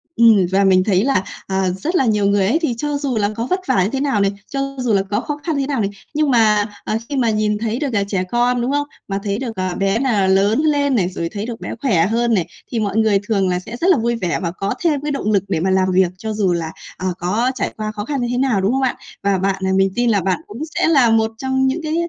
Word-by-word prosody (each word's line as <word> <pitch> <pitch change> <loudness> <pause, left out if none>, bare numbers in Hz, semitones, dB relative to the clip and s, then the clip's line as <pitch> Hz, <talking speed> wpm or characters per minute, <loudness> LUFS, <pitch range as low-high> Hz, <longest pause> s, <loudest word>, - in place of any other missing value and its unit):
Ừm, 225 -5 +5
và 195 +1 +3
mình 185 -1 +4
thấy 195 -1 +2
là, 230 -9 +1 0.2
ờ, 190 -1 0
rất 335 - -2
là 265 - +3
nhiều 210 -2 +2
người 200 -1 +2
ấy, 315 +9 +2
thì 260 -7 0
cho 295 +3 -2
dù 275 -5 -2
là 205 -1 +1
có 230 +2 -3
vất 370 +1 0
vả 185 - +3
như 195 - 0
thế 265 +3 -2
nào 270 -8 +1
này, 195 0 +2 0.2
cho 275 0 -3
dù 245 -4 0
là 195 -1 +3
có 205 - +1
khó 295 0 -4
khăn 320 -3 -1
như - - +1
thế 270 - -3
nào 270 -6 -1
này, 195 - 0 0.2
nhưng 300 -2 +1
mà, 215 -3 +4 0.2
ờ, 215 - -1
khi 285 - -3
mà 235 -3 +2
nhìn 215 -1 +1
thấy 225 +3 -2
được 290 - -1
là 200 -1 +2
trẻ 190 -2 -1
con, 245 0 +2
đúng 250 +3 -1
không? 290 0 0 0.2
Mà 195 0 -2
thấy 200 0 -2
được, 240 -4 -4
ờ, 185 -1 -2
bé 195 +3 +1
là 220 -8 +1
lớn 200 +5 +3
lên 285 -3 +2
này, 185 -4 +1
rồi 170 -2 -4
thấy 210 +1 -5
được 235 -1 -6
bé - - -5
khỏe 190 -12 +3
hơn 235 +1 +1
này, 180 -6 +1 0.2
thì 230 - -1
mọi 210 0 -1
người 215 -3 +3
thường 195 -4 +1
là 180 0 0
sẽ 230 +6 -8
rất 360 - +3
là 340 - +4
vui 235 +1 0
vẻ 185 -7 -2
và 170 - -1
có 195 +3 -3
thêm 300 -5 +1
cái 295 0 -2
động 215 -6 -1
lực 200 -2 +2
để 180 - -1
mà 190 +3 0
làm 190 0 +2
việc 185 -1 +3
cho 220 +2 -4
dù 195 -4 +1
là, 165 -1 -3 0.3
ờ, 185 - -3
có 215 +8 0
trải - - -2
qua 215 -1 -3
khó 210 -1 -5
khăn 280 -2 -2
như 240 - -1
thế 245 - -1
nào, 250 -7 +1
đúng 195 +4 +1
không 270 - 0
ạ? 255 - +1 0.3
Và 200 -1 +2
bạn, 190 0 -1
ờ 190 - +1
mình 195 0 +3
tin 240 -1 +2
là 205 -3 +2
bạn 185 -1 -1
cũng 230 +8 -9
sẽ - - +2
là 270 -8 +5
một 220 0 +2
trong 265 +1 0
những 300 +6 -1
cái 310 +1 -2
220 Hz, 300 wpm, -19 LUFS, 195-265 Hz, 0.3 s, Ừm